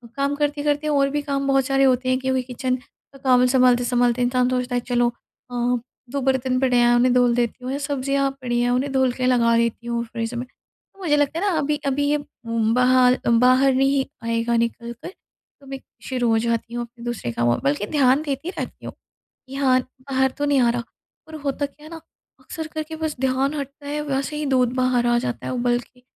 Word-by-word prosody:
काम 280 +1 0
करते-करते 295 0 -1
और 280 -2 +2
भी 295 +1 -1
काम 275 -1 -2
बहुत 270 -1 +3
सारे 270 -1 +2
होते 255 -1 +2
हैं 255 - +2
क्योंकि 260 0 0
किचन 255 +1 -2
का 265 +2 -21
काम 250 -1 +5
सँभालते-सँभालते 245 -1 +3
इंसान 250 0 +2
सोचता 250 0 -1
है 245 - +1
चलो 240 0 +3 0.4
अ, 245 0 0 0.3
2 280 - -2
बर्तन 260 -1 +1
पड़े 255 -2 +2
हैं 240 0 +5
उन्हें 245 +1 +3
धुल 245 -1 +3
देती 240 +1 -1
हूँ 255 - -3
या 275 - -2
सब्जियाँ 275 -1 0
पड़ी 240 -1 -1
हैं 245 - +1
उन्हें 255 +3 0
धुल 265 -1 +2
के 255 0 -2
लगा 235 -2 +3
देती 235 0 -1
हूँ 235 0 -1
फ़्रिज 230 0 -5
में। 240 +1 -4
तो 390 - -33
मुझे 315 -6 +1
लगता 290 +2 +1
है 395 - -1
ना 340 - 0
अभी 300 0 0
अभी 280 +1 0
ये 295 - +3 0.3
म 225 -1 +1
बाहर 250 0 +5
अ, - - +2
बाहर 255 +3 +4
नहीं 270 +1 +2 0.2
आएगा 230 +1 0
निकल 235 0 -2
कर - - -7 0.5
तो 275 - -16
मैं 270 0 -6 0.2
शुरू 250 -2 -1
हो 225 - +3
जाती 235 +1 -1
हूँ 240 0 -2
अपने 235 0 -16
दूसरे 235 - -3
कामों 120 +1 +1
में। - - -3
बल्कि 145 +8 0
ध्यान 275 -1 +3
देती 285 +4 -3
रहती - - -7
हूँ - - -6 0.5
कि 265 - -9
हाँ, 265 -2 +3 0.2
बाहर 265 -1 0
तो 290 - -1
नहीं 285 -2 +3
आ 240 - +4
रहा, 235 0 -1 0.4
पर 315 - -9
होता 285 +1 -1
क्या 295 +2 -13
है - - -11
ना 325 -1 -8 0.4
अक्सर 320 -2 -7
करके 315 0 -5
बस 315 -1 -3
ध्यान 265 +2 +1
हटता 285 0 -7
है 295 +1 -2
वैसे 275 +2 -2
ही 300 0 -3
दूध 255 -3 +2
बाहर 255 -1 +1
आ 240 0 +3
जाता 245 -1 -4
है - - -3
उबल 240 -1 +1
के। 250 +1 -16
255 Hz, 225 wpm, -22 LUFS, 240-275 Hz, 0.5 s, काम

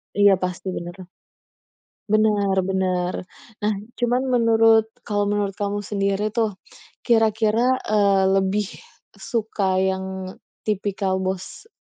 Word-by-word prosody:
Iya, 205 -1 +6
pasti. 185 +1 -3
Bener. 175 +1 -7 1.0
Bener, 210 -2 +2
bener. 185 -1 -1 0.3
Nah, 210 0 0 0.3
cuman 245 +1 +1
menurut 225 -2 +4 0.2
kalau 205 -2 0
menurut 205 -1 0
kamu 205 0 -2
sendiri 200 +1 -1
tuh, 220 -3 0 0.5
kira-kira, 225 +2 +3
eee, 200 -2 +3
lebih 195 +2 +1 0.5
suka 210 -5 -1
yang 190 0 -2 0.3
tipikal 195 -2 -1
bos 190 - -5
205 Hz, 100 wpm, -22 LUFS, 190-220 Hz, 1.0 s, Iya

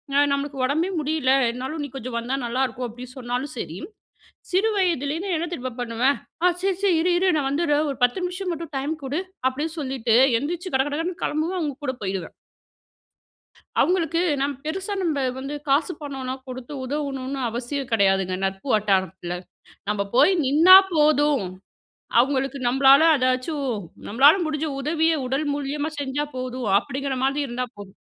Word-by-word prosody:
அ - - +5
நம்மளுக்கு 280 -1 -2
உடம்பே 315 +7 0
முடியல, 300 -3 0 0.2
என்னாலும் 260 +6 -5
நீ - - -4
கொஞ்சம் 255 -2 -5
வந்தா 245 +3 -2
நல்லாருக்கும் 250 0 -1
அப்டின்னு 245 +2 -10
சொன்னாலும் 250 +3 -3
சரி, 165 -6 -5 0.7
சிறு 385 +5 +3
வயதுலேருந்து 340 0 0
என்ன 335 +2 -2
தெரியுமா 255 -4 -4
பண்ணுவேன்? 245 +4 +1 0.3
"ஆ - - +6
சரி 385 -1 0
சரி, 385 -4 +4
இரு 360 +2 +2
இரு 370 0 +3
நான் 280 -2 0
வந்திட்றேன் 295 0 +1
ஒரு 270 - -7
10 245 +10 +2
நிமிஷம் 360 +1 -3
மட்டும் 330 -1 -7
டைம் 280 +4 -1
குடு'' 295 +8 -2 0.2
அப்டின்னு 310 +5 -4
சொல்லிட்டு 260 -5 0 0.2
எந்திரிச்சு 345 +7 -4
கட 265 - +4
கட 290 - -3
கடன்னு 355 +3 -3
கிளம்புவேன், 320 +5 -1
அவுங்க 295 -5 -2
கூட 260 - -1
போயிடுவேன். 190 -3 -4 1.5
அவுங்களுக்கு, 335 -2 +1 0.2
நாம் 285 +1 0
பெருசா 385 +6 -3
நம்ப 315 -5 0 0.2
வந்து 275 +2 -5 0.2
காசு 285 +6 +3
பணம்லாம் 265 -2 -5
கொடுத்து 255 +2 -7
உதவணுன்னு 275 -1 -3
அவசியம் 250 +4 -4
கிடையாதுங்க, 195 -3 +2
நட்பு 195 +6 -4
வட்டாரத்தில. 190 -4 0 0.6
நம்ப 200 -1 0
போயி 285 +9 +6
நின்னா 325 +8 +8 0.2
போதும். 295 - +3 0.8
அவுங்களுக்கு 270 +2 +1
நம்பளால 270 +3 +6
அதாச்சும், 255 +3 0 0.4
நம்பளால 275 - +6
முடிஞ்ச 310 0 -2
உதவிய 320 +3 +1
உடல் 270 +4 -1
மூலியமா 290 +2 -3
செஞ்சா 285 +1 -2
போதும். 255 -2 -4
அப்டிங்கிற 270 +4 -4
மாதி 275 +2 0
இருந்தா 250 +1 -3
போதும். 200 0 -11
275 Hz, 150 wpm, -23 LUFS, 255-315 Hz, 1.5 s, நின்னா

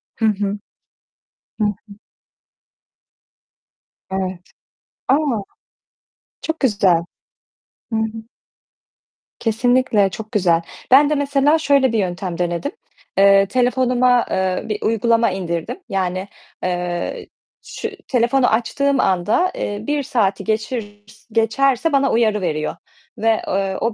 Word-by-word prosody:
Hı 225 - -1
hı. 205 -1 0 1.0
Hı - - +3 0.2
hı. 200 - -12 2.1
Evet. 190 -2 -3 0.7
A! 270 - +5 1.3
Çok 320 0 -3
güzel. 195 - +2 0.9
Hı 220 - +1
hı. 220 - +1 1.4
Kesinlikle 230 -3 +2
çok 220 +2 -8
güzel. 175 -6 +2 0.3
Ben 285 +3 +7
de 300 - +1
mesela 285 +2 +2
şöyle 280 -4 +3
bir 220 - +2
yöntem 180 -1 -3
denedim. 175 - -2 0.5
Eee, 195 0 +6
telefonuma, 250 +1 +2
eee, 190 -1 0
bir 210 - -3
uygulama 230 0 +2
indirdim. 170 - -4
Yani, 185 0 -2 0.4
eee, 175 -1 -3 0.4
şu 450 - -5 0.2
telefonu 245 +1 +2
açtığım 275 +4 +1
anda, 200 - +2
eee, 205 0 -3
1 295 -1 0
saati 200 -6 0
geçir 215 -1 -3 0.3
geçerse 260 +7 +2
bana 275 -1 +2
uyarı 215 -3 +2
veriyor. 155 -2 -2 0.4
Ve, 225 0 +2
eee, 195 0 -1
o 230 -1 0
220 Hz, 110 wpm, -20 LUFS, 190-255 Hz, 2.1 s, Ben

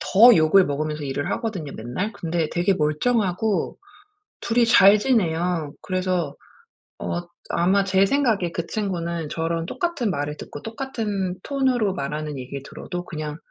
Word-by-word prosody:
더 230 +3 +7
욕을 160 +4 +5
먹으면서 150 +1 -2
일을 140 +1 -3
하거든요, 190 - -3
맨날. 125 - -3
근데 165 -4 -2
되게 175 +3 +2
멀쩡하고 190 +4 0 0.6
2 235 +1 -1
이 235 - +5
잘 205 -2 +7
지내요. 175 - 0
그래서 185 -5 -1 0.6
어 175 - -2 0.3
아마 190 +4 +3
제 190 0 +3
생각에 220 -10 +1
그 170 0 -3
친구는 170 -6 -2
저랑 165 0 -2
똑같은 335 - -1
말을 145 0 -3
듣고 145 - -9
똑같은 220 -6 -3
톤으로 255 -8 +1
말하는 150 -1 -4
얘기를 130 +2 -6
들어도 175 +3 -6
그냥 155 -3 -5
180 Hz, 300 characters per minute, -23 LUFS, 155-210 Hz, 0.6 s, 더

